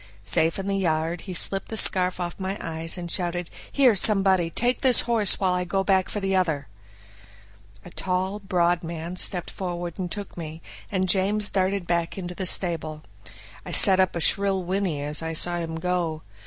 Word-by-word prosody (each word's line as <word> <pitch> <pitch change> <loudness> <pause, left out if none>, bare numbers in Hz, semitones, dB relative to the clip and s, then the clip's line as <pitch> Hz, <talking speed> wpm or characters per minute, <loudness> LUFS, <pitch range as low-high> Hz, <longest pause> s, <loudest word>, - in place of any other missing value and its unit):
Safe 160 +9 +2
in 195 - -5
the 195 0 -2
yard, 165 -1 -1
he - - -4
slipped 195 +2 +3
the 220 - -4
scarf 185 -2 +4
off 175 +1 -5
my 190 +1 -4
eyes, 165 +1 -2
and 175 -1 -7
shouted, 175 -1 -3 0.2
"Here 265 -4 +4
somebody! 190 -4 +4
take 245 +9 -1
this 255 -3 +4
horse 225 -4 +3
while 185 -2 +1
I 180 0 -1
go 195 +2 -2
back 190 -1 +1
for 210 - -4
the 195 -1 -1
other." 160 -7 -1 1.2
A 175 - -11
tall, 190 +3 -3
broad 175 -3 0
man 170 +1 -6
stepped 180 -1 +3
forward 175 -1 -6
and 180 -2 -4
took 205 -2 -7
me, 160 -2 -8 0.3
and 190 -2 -1
James 200 +3 +1
darted 190 -1 -1
back 170 +1 -2
into 180 -2 -6
the 185 +1 -2
stable. 160 -4 +1 0.6
I - - -9
set 190 -3 +6
up 185 -2 +1
a - - -2
shrill 195 +1 +1
whinny 180 -5 -3
as 150 +2 0
I 165 0 -4
saw 175 +2 +1
him 165 -1 -5
go. 165 -2 -3
180 Hz, 190 wpm, -24 LUFS, 170-195 Hz, 1.2 s, set